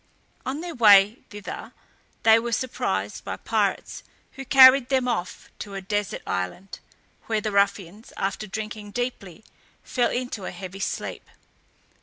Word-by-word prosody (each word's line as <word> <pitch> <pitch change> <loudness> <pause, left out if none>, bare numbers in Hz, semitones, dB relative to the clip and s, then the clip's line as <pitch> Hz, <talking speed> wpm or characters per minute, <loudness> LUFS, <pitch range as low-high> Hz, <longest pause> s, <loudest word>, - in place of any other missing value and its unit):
On 275 +4 -3
their 345 -1 -6
way 210 -2 +6
thither 205 -1 -8 0.5
they 225 0 +7
were 235 0 -3
surprised 255 +2 -2
by - - -5
pirates, - - -1 0.3
who 270 - -8
carried 260 -1 +7
them 260 -2 +1
off 225 -7 -4
to 200 -1 -7
a - - -3
desert 205 +1 -3
island, 95 - -4 0.5
where 220 -1 0
the 215 0 -3
ruffians, 200 +1 0
after 200 +2 -3
drinking 215 0 -6
deeply, 230 -7 -5 0.4
fell 245 -2 0
into 245 -6 -4
a - - -3
heavy 190 0 -8
sleep. - - -4
215 Hz, 140 wpm, -24 LUFS, 195-245 Hz, 0.5 s, they